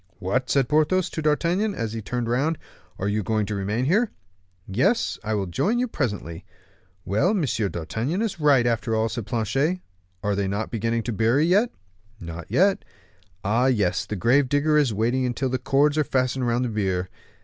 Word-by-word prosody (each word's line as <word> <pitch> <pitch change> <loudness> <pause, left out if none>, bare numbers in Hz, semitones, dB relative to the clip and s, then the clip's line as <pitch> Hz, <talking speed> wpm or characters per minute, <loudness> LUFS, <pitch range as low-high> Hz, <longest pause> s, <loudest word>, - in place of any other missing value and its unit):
"What!" 110 +6 -1
said 135 0 +2
Porthos 155 +5 +2
to 160 - -3
D'Artagnan, 170 +7 +1
as 115 -2 -3
he 115 - -4
turned 120 +2 -3
round, 140 +7 +1 0.4
"are 95 - -2
you 105 +1 0
going 110 +1 0
to 105 - -4
remain 105 +5 -1
here?" 210 - +2 0.6
"Yes, 125 - +1
I 110 0 -1
will 100 -2 -1
join 190 - 0
you 250 +1 +1
presently." 100 - -3 0.6
"Well, 105 - +2
M. - - +1
D'Artagnan 110 - -2
is 195 -6 -3
right, 140 -5 +4
after 115 -1 0
all," 110 +1 +1
said 110 -2 -5
Planchet: 130 - 0 0.4
"are 105 - +1
they 100 0 -1 0.2
beginning 115 0 -1
to 120 - -3
bury 115 +8 +2
yet?" 205 +8 +3 0.5
"Not 85 -1 -8
yet." 195 +2 +3 0.6
"Ah! 115 +6 +2
yes, 105 -9 +1
the 105 - -3
grave 125 +7 +3
digger 145 +2 +2
is 145 -5 +3
waiting 115 +5 0
until 125 +2 -1
the 130 0 -1
cords 145 +4 +2
are - - +4
fastened 130 -2 0
round 120 +2 +1
the - - -2
bier. 95 -4 -1
120 Hz, 180 wpm, -24 LUFS, 105-150 Hz, 0.6 s, right